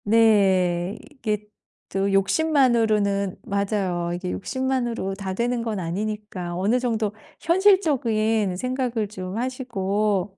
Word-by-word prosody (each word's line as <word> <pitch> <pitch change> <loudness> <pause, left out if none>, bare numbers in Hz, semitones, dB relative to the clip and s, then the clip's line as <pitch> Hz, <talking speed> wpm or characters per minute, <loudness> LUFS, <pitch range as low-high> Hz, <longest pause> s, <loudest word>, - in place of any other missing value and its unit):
네. 195 -4 +3
이게 215 -7 -3 0.4
또 195 +1 0
욕심만으로는 215 - +2
맞아요. 195 -4 -1
이게 180 0 -4
욕심만으로 245 -5 -2
다 195 -1 -4
되는 240 +2 0
건 225 -3 -2
아니니까 190 0 -4
어느 210 +7 +2
정도 225 -4 -1 0.3
현실적인 255 - +2
생각을 250 -2 -1
좀 185 -1 -6
하시고. 210 -6 -1
210 Hz, 250 characters per minute, -24 LUFS, 195-240 Hz, 0.4 s, 네